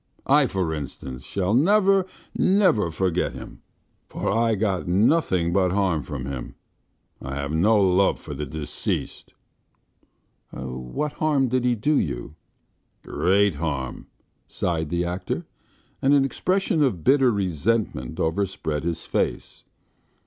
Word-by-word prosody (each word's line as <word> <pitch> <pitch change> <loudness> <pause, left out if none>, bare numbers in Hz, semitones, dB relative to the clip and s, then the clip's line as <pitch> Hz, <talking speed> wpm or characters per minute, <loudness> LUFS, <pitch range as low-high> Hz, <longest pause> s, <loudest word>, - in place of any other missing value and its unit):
I, 140 0 +4
for 95 -7 -1
instance, 65 -3 -7
shall 95 +1 -1
never, 195 - +4 0.3
never 185 - +3
forget 90 +1 -1
him, - - -10 0.5
for - - -2
I 115 +1 +2
got 100 -4 -1
nothing 95 - +2
but 95 -1 +2
harm 95 -5 +1
from 70 -3 -6
him. 65 -3 -6 0.7
I 70 0 -5
have 70 +1 -3
no 105 +8 +3
love 95 0 +3
for 75 - -8
the 75 +1 -5
deceased." 75 +2 -4 1.2
"What 65 - -4
harm 145 -5 +1
did 125 0 0
he 125 -1 +3
do 145 +7 +2
you?" - - -4 0.7
"Great 100 +1 +2
harm," 70 -5 -4 0.4
sighed 80 -3 -2
the 85 +1 0
actor, 90 +1 -3 0.6
and 140 +2 +4
an 135 -1 +4
expression 185 +4 0
of 115 - +1
bitter 135 - +5
resentment 95 - -1
overspread 80 -3 -1
his 85 0 -3
face. - - -2
95 Hz, 125 wpm, -24 LUFS, 80-125 Hz, 1.2 s, bitter